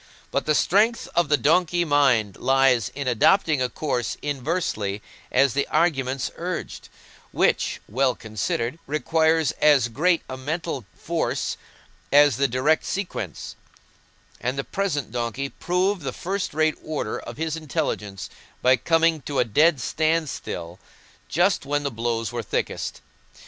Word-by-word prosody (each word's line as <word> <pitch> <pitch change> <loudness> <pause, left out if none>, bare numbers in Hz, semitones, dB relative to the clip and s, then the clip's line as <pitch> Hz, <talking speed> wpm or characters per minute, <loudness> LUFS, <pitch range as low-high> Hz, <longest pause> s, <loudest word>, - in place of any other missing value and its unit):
But - - -1
the 150 - +3
strength 215 +9 +2
of 175 -4 +2
the 150 - +4
donkey 175 +5 +2
mind 130 - +2
lies 135 -3 +3
in 140 -1 -4
adopting 145 - +3
a 125 - +1
course 125 -3 -2
inversely 135 - -2 0.3
as 140 -3 +3
the 140 +1 0
arguments 135 -5 0
urged, 175 0 -5 0.4
which, - - +1
well 130 +3 +1
considered, 115 - -3
requires 160 +2 +2
as 140 -6 +5
great 165 +8 +2
a 130 - -6
mental 150 - -4
force - - -2 0.6
as 145 -1 +6
the 140 0 +3
direct 130 +6 +2
sequence; 195 -2 -4 0.8
and 125 +3 -2
the 135 - -1
present 155 - -2
donkey 120 +3 -3
proved 180 +4 0
the 135 -3 -4
first 190 -3 -3
rate 155 0 +1
order 155 -1 -3
of - - -9
his 160 0 -2
intelligence 105 - -3 0.4
by 130 +1 +5
coming 165 0 +2
to 140 +1 -4
a - - +3
dead 150 +7 +3
standstill 150 - -2 0.5
just 180 +3 +2
when 145 +1 -1
the 140 - -2
blows 115 0 -2
were 120 -1 -3
thickest. 110 - -3
145 Hz, 140 wpm, -24 LUFS, 125-165 Hz, 0.8 s, as